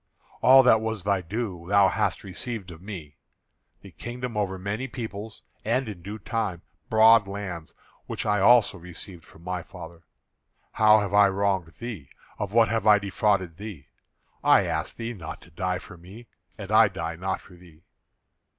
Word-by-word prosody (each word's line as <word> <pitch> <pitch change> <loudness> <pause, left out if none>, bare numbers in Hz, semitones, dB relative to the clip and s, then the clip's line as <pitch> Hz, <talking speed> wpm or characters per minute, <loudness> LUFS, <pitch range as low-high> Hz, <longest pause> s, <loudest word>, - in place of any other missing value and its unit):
All 135 +1 +8
that 110 -3 +5
was 110 -4 -3
thy 100 -1 +1
due 90 -2 -5
thou 100 -1 +5
hast - - -1
received 100 0 -6
of 80 -1 -12
me; 90 -7 -9 0.6
the 100 - -13
kingdom 120 +7 -6
over 100 -3 -1
many 105 +7 -4
people, 110 -4 -6 0.3
and, 125 +3 0
in 100 -5 -7
due 100 +5 -7
time, 105 -5 -3 0.3
broad 110 -1 +6
lands 95 -5 -7 0.3
which - - -4
I 105 -1 +2
also 115 +1 +5
received 90 0 -11
of 80 - -16
my 90 0 -3
father. 80 0 -11 0.7
How 110 0 +5
have 100 -1 -4
I 100 -1 +6
wronged 95 -4 -1
thee? 115 - -7 0.3
Of 100 -2 -3
what 115 0 +4
have 115 -2 -1
I 105 -1 +8
defrauded 100 -3 0
thee? 100 -10 -9 0.5
I - - +5
ask - - -3
thee 115 +1 -5
not 80 -7 -8
to 80 +3 -18
die 90 +2 -2
for 90 - -12
me; 95 +8 -13 0.3
and - - -8
I - - +7
die 80 0 -5
not 95 +2 -3
for 95 - -17
thee. 85 -2 -18
100 Hz, 170 wpm, -26 LUFS, 90-110 Hz, 0.7 s, All